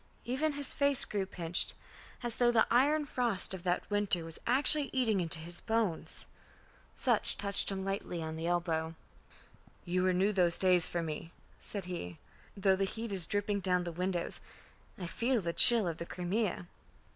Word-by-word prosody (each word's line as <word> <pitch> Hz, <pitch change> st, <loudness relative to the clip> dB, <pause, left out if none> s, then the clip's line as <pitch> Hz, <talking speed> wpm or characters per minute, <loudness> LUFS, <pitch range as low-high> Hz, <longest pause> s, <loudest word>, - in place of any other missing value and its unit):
Even 290 Hz, +5 st, -1 dB
his 285 Hz, -1 st, -3 dB
face 280 Hz, -2 st, +1 dB
grew 200 Hz, -2 st, -3 dB
pinched, 175 Hz, -2 st, +4 dB, 0.5 s
as 240 Hz, -2 st, -2 dB
though 240 Hz, -1 st, +3 dB
the 225 Hz, -2 st, +3 dB
iron 290 Hz, +5 st, +3 dB
frost 240 Hz, -9 st, -1 dB
of 190 Hz, -, -6 dB
that 175 Hz, 0 st, -2 dB
winter 205 Hz, -5 st, 0 dB
was 165 Hz, -1 st, -3 dB
actually 280 Hz, +3 st, +4 dB
eating 230 Hz, -6 st, +1 dB
into 165 Hz, -2 st, 0 dB
his 170 Hz, +2 st, -8 dB
bones. 220 Hz, -7 st, -2 dB, 0.7 s
Sutch -, -, +1 dB
touched 200 Hz, -1 st, +1 dB
him 190 Hz, -1 st, -4 dB
lightly 195 Hz, -3 st, -4 dB
on 160 Hz, -1 st, -5 dB
the 165 Hz, +1 st, -4 dB
elbow. 165 Hz, -2 st, -1 dB, 0.9 s
"You 180 Hz, +1 st, -1 dB
renew 185 Hz, +2 st, +2 dB
those 180 Hz, -4 st, +4 dB
days 180 Hz, -2 st, +3 dB
for 170 Hz, -1 st, -2 dB
me," 160 Hz, +1 st, -6 dB, 0.3 s
said 200 Hz, -3 st, -5 dB
he. 90 Hz, -, -6 dB, 0.4 s
"Though 195 Hz, -1 st, +3 dB
the 195 Hz, +1 st, 0 dB
heat 225 Hz, +3 st, -6 dB
is 185 Hz, -4 st, +1 dB
dripping 205 Hz, 0 st, -1 dB
down 180 Hz, -2 st, 0 dB
the 175 Hz, -, -5 dB
windows, 180 Hz, +1 st, -3 dB, 0.6 s
I 180 Hz, -, -6 dB
feel 230 Hz, +8 st, -1 dB
the 170 Hz, -4 st, -3 dB
chill 230 Hz, -2 st, +8 dB
of 165 Hz, -2 st, -4 dB
the 170 Hz, -, -6 dB
Crimea." 185 Hz, +1 st, -3 dB
190 Hz, 170 wpm, -31 LUFS, 175-225 Hz, 0.9 s, chill